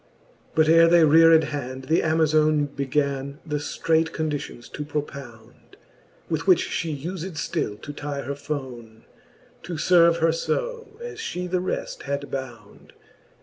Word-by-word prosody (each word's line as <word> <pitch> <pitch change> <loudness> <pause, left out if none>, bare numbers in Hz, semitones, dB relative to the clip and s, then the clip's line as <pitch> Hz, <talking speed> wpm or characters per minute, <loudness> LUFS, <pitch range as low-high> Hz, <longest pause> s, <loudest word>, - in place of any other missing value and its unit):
But 155 -1 +4
ere 165 +1 +7
they 170 0 +6
reared 160 +1 +6
hand, 130 -3 -5
the 160 +5 +2
Amazone 155 -2 +2
Began 140 0 -1
the 150 -2 -2
ftreight 160 +2 0
conditions 150 -6 -4
to 150 - -6
propound, 140 -6 -8 0.5
With 165 +2 -3
which 185 -3 +5
fhe 155 -4 -2
ufed 185 0 -5
ftill 150 - -3
to 145 - -7
tye 145 -1 -5
her 140 - -3
fonc; 130 -6 -7 0.6
To 175 - -7
ierve 170 +1 +4
her 165 0 +3
fb, 470 - -3
as 470 -3 -7
fhe 180 - -4
the 180 0 0
reft 185 - -4
had 140 0 -3
bound. 120 -6 -8
155 Hz, 145 wpm, -24 LUFS, 140-165 Hz, 0.6 s, ere